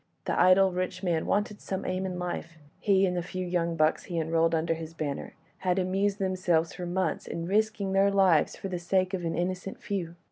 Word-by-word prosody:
The - - 0
idle, 185 +1 +6
rich 185 +1 -3
man 170 -3 0
wanted 210 +1 0
some 190 - -4
aim 185 +1 -1
in 180 -1 -4
life—he, 175 +2 -1
and 180 -1 0
the 175 - 0
few 185 +1 -4
young 170 -1 0
bucks 155 0 +2
he 175 -3 -4
enrolled 165 +1 +2
under 165 +1 +1
his 165 0 -7
banner, 145 -3 -4 0.2
had 180 0 0
amused 195 +2 +1
themselves 185 -4 +1
for 180 - -5
months 175 -2 -1
in 165 - -4
risking 205 0 0
their 195 +1 +4
lives 190 -6 +3
for - - -6
the 180 -2 -3
sake 185 +2 +1
of 185 -2 -2
an 165 -1 -1
innocent 185 +2 -3
few. 175 -4 -4
180 Hz, 205 wpm, -28 LUFS, 165-190 Hz, 0.2 s, idle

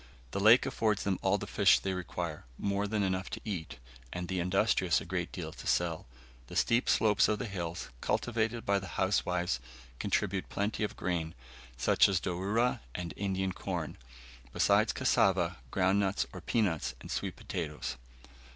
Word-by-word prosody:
The 100 - -2
lake 110 +5 +7
affords 105 -2 0
them 95 -2 0
all 95 +1 +3
the 100 - -5
fish 100 -2 +5
they 95 - -2
require, 85 -4 -4
more 100 +1 0
than 105 0 0
enough 95 0 -1
to - - -6
eat, 90 - -4 0.3
and 90 0 -4
the 95 0 -1
industrious 90 0 +2
a - - -8
great - - -2
deal - - -5
to - - -9
sell. 85 -5 0 0.4
The - - -9
steep 115 +2 +2
slopes 105 -2 +4
of 110 - +1
the 125 - -3
hills, 90 -5 -4
cultivated 115 -1 0
by 100 0 +3
the 95 - -8
housewives, 90 -6 +1 0.4
contribute 95 0 0
plenty 105 +2 -1
of 105 - -2
grain, 85 -2 -2 0.4
such - - +4
as 95 -2 +2
dourra 100 +8 0 0.2
and 85 -2 -4
Indian 95 -1 -1
corn, - - -4 0.6
besides - - +3
cassava, - - +2
ground 95 +6 +2
nuts 100 0 +1
or 90 - -7
peanuts, 95 -5 0
and - - -9
sweet - - -2
potatoes. 80 -5 -4
95 Hz, 165 wpm, -31 LUFS, 90-105 Hz, 0.6 s, lake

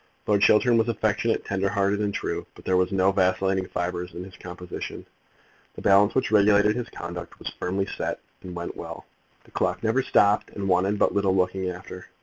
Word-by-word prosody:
Lord 105 -1 +2
Chiltern 115 +3 +5
was 110 - +2
affectionate, 110 0 0
tender 95 0 0
hearted, 100 0 +1
and 105 -1 0
true; - - -3
but - - -15
there 95 - +2
were 90 0 +3
no 95 0 +3
vacillating 95 0 +1
fibres 90 0 -4
in 90 - -5
his 95 0 -12
composition. 90 0 -7 0.7
The - - -9
balance 100 +1 +5
which 130 -6 +1
regulated 105 0 +5
his 125 -1 -4
conduct 85 0 -7
was - - -6
firmly 95 +2 -1
set, - - -4 0.2
and 90 -1 -8
went 85 0 -5
well. - - -8 0.4
The - - -22
clock - - -1
never 115 +4 +2
stopped, 105 -5 +3
and 100 -1 -3
wanted 95 +3 +2
but - - +2
little 100 -2 +2
looking 95 0 0
after. 90 +1 -9
95 Hz, 190 wpm, -25 LUFS, 90-105 Hz, 0.7 s, Chiltern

